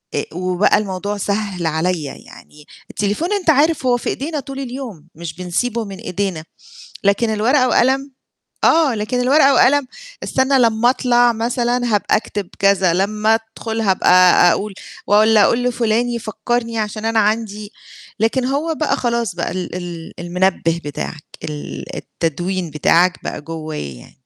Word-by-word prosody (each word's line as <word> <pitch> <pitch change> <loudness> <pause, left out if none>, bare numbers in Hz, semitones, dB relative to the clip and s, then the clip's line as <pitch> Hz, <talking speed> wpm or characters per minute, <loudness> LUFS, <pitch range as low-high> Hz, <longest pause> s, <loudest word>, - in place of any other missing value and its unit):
إ - - 0
وبقى 185 +2 +2
الموضوع 205 0 -3
سهَّل 200 -3 -2
عليّا، 160 -2 -1
يعني 150 0 -15 0.2
التليفون 210 - -1
أنت 365 -5 0
عارف 300 -1 +3
هو 245 -1 +3
في - - -4
إيدينا 300 +2 -3
طول 275 0 -7
اليوم 240 - -7
مش 165 -1 -7
بنسيبه 220 +6 -2
من 195 -1 -8
إيدينا، 190 -5 -3 0.6
لكن 200 +3 +2
الورقة 255 +5 +2
وقلم، 270 +3 +2 0.5
آه، 315 -6 +4
لكن 225 +4 -2
الورقة 275 +2 +4
وقلم 285 0 +4 0.4
استنى 265 +1 +2
لمّا 230 0 +3
أطلع 245 -2 +3
مثلًا 240 +1 0
هابقى 205 - +2
أكتب 205 -3 -4
كذا، 195 -3 +3
لمّا 210 +4 +1 0.2
أدخل 225 0 -3
هابقى 190 -4 +2 0.4
أقول 205 -1 -3 0.3
والّا 215 +1 +5
أقول 240 +4 +2
لفُلان 235 0 0
فكّرني 230 +1 -3
عشان 215 0 -3
أنا 225 0 +1
عَندي 215 -1 -1 0.5
لكن 240 +3 +1
هو 290 +5 -1
بقى 310 -1 0
خلاص 235 -6 -1
بقى 170 - -3
ال 180 -1 -5
ال 175 -2 -7
المنبه 175 -1 0
بتاعك 145 +1 -6 0.2
ال 150 -1 -6
التدوين 175 +2 -3
بتاعك 170 +4 +2
بقى - - -4
جوايا 155 - -6
يعني. - - -16
215 Hz, 145 wpm, -18 LUFS, 180-245 Hz, 0.6 s, والّا